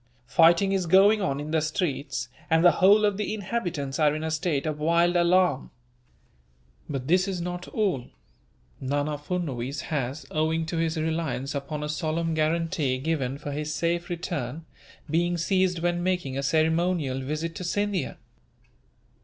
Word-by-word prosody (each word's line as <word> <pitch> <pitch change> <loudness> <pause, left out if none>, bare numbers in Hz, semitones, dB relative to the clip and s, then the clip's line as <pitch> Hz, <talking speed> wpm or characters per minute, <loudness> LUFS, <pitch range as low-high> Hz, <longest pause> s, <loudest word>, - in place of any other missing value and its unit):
Fighting 170 +8 +4
is 190 -3 0
going 200 +5 +5
on 140 -6 -1
in 150 +1 -5
the 160 -1 +2
streets, 145 -5 -2 0.2
and 160 +2 +4
the 175 - +9
whole 205 +3 +6
of 205 -2 +1
the 210 +1 -2
inhabitants 175 -10 -3
are 150 -1 +3
in 155 - -4
a 160 - -2
state 155 -3 -1
of 155 -1 -2
wild 170 +3 +3
alarm. 175 -4 +3 1.2
"But 135 -3 -4
this 180 +4 +3
is 190 -2 -2
not 180 +1 -5
all. 190 - -1 0.7
Nana 145 +2 -1
Furnuwees 145 -5 -3
has, 140 0 -3
owing 160 +1 0
to 165 +1 -3
his 165 0 0
reliance 160 -4 -2
upon 145 +1 -4
a - - -2
solemn 160 +2 -1
guarantee 160 -3 0
given 135 -2 -2
for 145 - -6
his 150 +1 -3
safe 170 +2 -1
return, 165 -4 -4 0.4
been 175 +3 +1
seized 185 +1 +1
when 175 0 +1
making 175 -7 -1
a 135 - -1
ceremonial 160 -1 +1
visit 155 +5 -3
to - - -5
Scindia." 200 -3 -1
160 Hz, 155 wpm, -26 LUFS, 145-175 Hz, 1.2 s, the